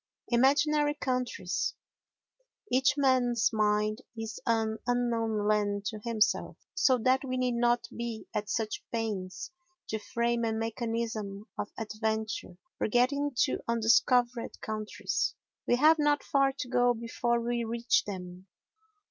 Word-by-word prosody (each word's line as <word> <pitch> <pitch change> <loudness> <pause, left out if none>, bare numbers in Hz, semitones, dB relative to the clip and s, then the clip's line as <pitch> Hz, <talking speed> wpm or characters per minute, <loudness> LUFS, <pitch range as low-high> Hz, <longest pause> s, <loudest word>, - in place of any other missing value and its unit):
Imaginary 290 +4 +3
Countries 250 - -2 1.0
Each 260 +3 +3
man's 250 -4 +3
mind 215 +1 +1 0.2
is 225 +1 -5
an 220 -1 +1
unknown 230 -3 0
land 205 -1 +1
to 215 - -7
himself, 225 -3 +1 0.2
so 280 -9 +4
that 255 +3 +2
we 255 -1 -2
need 250 -1 +1
not 240 0 +2
be 235 -2 -5
at 210 -1 -2
such 220 -2 -2
pains 210 - -3 0.4
to 220 - -2
frame 235 +2 -1
a 225 -1 0
mechanism 225 -2 -3
of 205 - -4
adventure 220 -3 -3 0.2
for - - +1
getting 280 +5 +2
to 265 - 0
undiscovered 235 +1 +2
countries. 215 -4 -2 0.3
We - - +4
have 310 +5 +5
not 295 0 +2
far 275 -1 +2
to 265 -2 -6
go 245 -1 +3
before 235 +1 -1
we 235 0 -1
reach 230 +1 +1
them. 185 -1 -7
235 Hz, 130 wpm, -30 LUFS, 220-250 Hz, 1.0 s, have